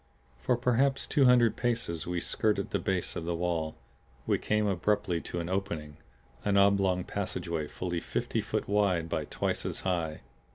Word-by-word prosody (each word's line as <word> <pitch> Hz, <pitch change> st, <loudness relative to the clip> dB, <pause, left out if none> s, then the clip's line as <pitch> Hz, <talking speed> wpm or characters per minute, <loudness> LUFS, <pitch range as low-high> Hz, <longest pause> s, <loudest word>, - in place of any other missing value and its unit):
For 115 Hz, -, +1 dB
perhaps 125 Hz, +3 st, +2 dB
two 140 Hz, -4 st, +3 dB
hundred 120 Hz, -2 st, +5 dB
paces 115 Hz, -10 st, -1 dB
we 90 Hz, 0 st, -1 dB
skirted 100 Hz, +3 st, 0 dB
the -, -, +1 dB
base 95 Hz, -3 st, -1 dB
of 80 Hz, -, -4 dB
the 85 Hz, 0 st, -1 dB
wall. 85 Hz, -2 st, -1 dB, 0.5 s
We -, -, +1 dB
came 105 Hz, 0 st, +1 dB
abruptly 100 Hz, -2 st, +1 dB
to 85 Hz, -, -4 dB
an 85 Hz, -, -3 dB
opening, 85 Hz, -6 st, -3 dB, 0.5 s
an 100 Hz, -1 st, +2 dB
oblong 100 Hz, -2 st, +4 dB
passageway 85 Hz, -5 st, -3 dB
fully 85 Hz, +2 st, -3 dB
fifty -, -, -2 dB
foot -, -, -2 dB
wide 100 Hz, -5 st, +2 dB
by 80 Hz, -2 st, -1 dB
twice -, -, -2 dB
as -, -, -2 dB
high. 85 Hz, -4 st, -1 dB
95 Hz, 165 wpm, -30 LUFS, 85-105 Hz, 0.5 s, hundred